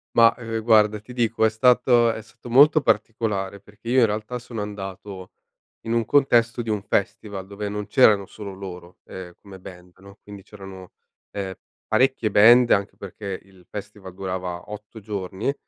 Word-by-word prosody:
Ma, 115 Hz, 0 st, +6 dB
ehm, 115 Hz, -2 st, -5 dB
guarda 105 Hz, -2 st, +4 dB
ti 115 Hz, +4 st, -13 dB
dico 115 Hz, -2 st, 0 dB
è -, -, +4 dB
stato 120 Hz, 0 st, +3 dB
è 110 Hz, -, -6 dB
stato 115 Hz, +2 st, -14 dB
molto 145 Hz, +5 st, +6 dB
particolare, 105 Hz, -4 st, -1 dB
perché 105 Hz, +3 st, -12 dB
io 130 Hz, +2 st, +4 dB
in 120 Hz, -, +6 dB
realtà 110 Hz, +3 st, -4 dB
sono 115 Hz, -3 st, -7 dB
andato 95 Hz, -2 st, -8 dB, 0.5 s
in 115 Hz, -, -4 dB
un 115 Hz, -1 st, +1 dB
contesto 120 Hz, -4 st, +2 dB
di 115 Hz, -, -6 dB
un 105 Hz, -2 st, -1 dB
festival 100 Hz, -1 st, -3 dB
dove 100 Hz, +1 st, -6 dB
non 105 Hz, 0 st, -4 dB
c'erano 105 Hz, -6 st, +4 dB
solo 100 Hz, 0 st, -9 dB
loro, 90 Hz, -2 st, -10 dB
ehm, 90 Hz, -2 st, -9 dB
come 95 Hz, -2 st, -13 dB
band, 90 Hz, -1 st, -13 dB
no, 100 Hz, +1 st, -15 dB
quindi 100 Hz, -1 st, -12 dB
c'erano, 95 Hz, -3 st, -12 dB, 0.4 s
ehm 95 Hz, -2 st, -5 dB, 0.4 s
parecchie 130 Hz, -4 st, +2 dB
band 120 Hz, +4 st, +6 dB
anche 100 Hz, 0 st, +1 dB
perché 100 Hz, 0 st, -7 dB
il 95 Hz, -2 st, -22 dB
festival 105 Hz, -2 st, -9 dB
durava 90 Hz, -2 st, -5 dB
8 105 Hz, +1 st, -10 dB
giorni. 100 Hz, +3 st, -4 dB
105 Hz, 170 wpm, -23 LUFS, 95-115 Hz, 0.5 s, Ma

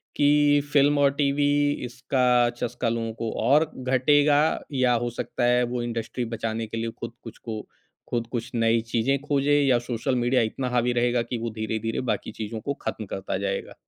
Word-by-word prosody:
कि 145 Hz, 0 st, +4 dB
फ़िल्म 145 Hz, 0 st, +4 dB
और 140 Hz, -1 st, +4 dB
टीवी 145 Hz, 0 st, +1 dB, 0.4 s
इसका 125 Hz, -1 st, +2 dB
चस्का 120 Hz, 0 st, -2 dB
लोगों 115 Hz, -1 st, -2 dB
को 115 Hz, -, -1 dB
और 150 Hz, +4 st, +4 dB
घटेगा 145 Hz, +3 st, +3 dB, 0.4 s
या 130 Hz, -2 st, +3 dB
हो 120 Hz, -, -1 dB
सकता 120 Hz, +1 st, -3 dB
है 125 Hz, 0 st, +3 dB
वो 120 Hz, -, -1 dB
इंडस्ट्री 120 Hz, +1 st, -3 dB
बचाने 115 Hz, 0 st, -3 dB
के 115 Hz, -, -6 dB
लिए 115 Hz, 0 st, -2 dB
खुद 115 Hz, -1 st, -6 dB
कुछ 115 Hz, -, -10 dB
को 110 Hz, -2 st, -6 dB, 0.5 s
खुद 115 Hz, -1 st, -2 dB
कुछ 120 Hz, 0 st, -4 dB
नई 115 Hz, 0 st, +3 dB
चीज़ें 130 Hz, +4 st, +2 dB
खोजें 145 Hz, 0 st, +2 dB
या 130 Hz, -3 st, +3 dB
सोशल 120 Hz, +1 st, -2 dB
मीडिया 125 Hz, +1 st, +2 dB
इतना 130 Hz, -2 st, -3 dB
हावी 125 Hz, 0 st, +1 dB
रहेगा 120 Hz, 0 st, +2 dB
कि 120 Hz, +1 st, -4 dB
वो 115 Hz, +1 st, -3 dB
धीरे-धीरे 110 Hz, +1 st, -3 dB
बाकी -, -, -3 dB
चीज़ों 110 Hz, 0 st, -5 dB
को 140 Hz, -, -2 dB
खत्म 110 Hz, -, -4 dB
करता 95 Hz, -1 st, -4 dB
जाएगा? 100 Hz, 0 st, -3 dB
120 Hz, 180 wpm, -25 LUFS, 115-135 Hz, 0.5 s, कि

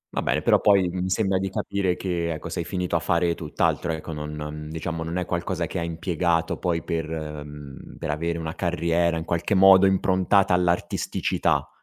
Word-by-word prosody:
Va -, -, +1 dB
bene, -, -, 0 dB
però -, -, +4 dB
poi, 100 Hz, -3 st, +4 dB
mi 90 Hz, +1 st, -3 dB
sembra 95 Hz, 0 st, +1 dB
di 95 Hz, 0 st, -2 dB
capire 95 Hz, -1 st, -1 dB
che, 85 Hz, -3 st, -2 dB
ecco, 75 Hz, -, -7 dB
sei -, -, -3 dB
finito 90 Hz, -2 st, -2 dB
a -, -, +3 dB
fare 85 Hz, 0 st, +1 dB
tutt'altro, 80 Hz, +1 st, -1 dB
ecco. 80 Hz, 0 st, -6 dB
Non 75 Hz, 0 st, -5 dB
non, 75 Hz, 0 st, -6 dB
diciamo 80 Hz, +1 st, -4 dB
non 85 Hz, +2 st, -4 dB
è 90 Hz, -, -1 dB
qualcosa 85 Hz, 0 st, -2 dB
che 90 Hz, -, -4 dB
hai 85 Hz, -, -2 dB
impiegato 85 Hz, 0 st, 0 dB
poi 85 Hz, -3 st, -1 dB
per, 80 Hz, -1 st, -3 dB
uhm, 75 Hz, -3 st, -7 dB
per 80 Hz, -2 st, -3 dB
avere 85 Hz, +3 st, -2 dB
una 80 Hz, -1 st, -4 dB
carriera 85 Hz, -1 st, 0 dB
in 80 Hz, -, -4 dB
qualche 85 Hz, +4 st, 0 dB
modo 95 Hz, 0 st, +7 dB
improntata 95 Hz, 0 st, +3 dB
all'artisticità. 90 Hz, -1 st, 0 dB
85 Hz, 190 wpm, -24 LUFS, 80-90 Hz, -, modo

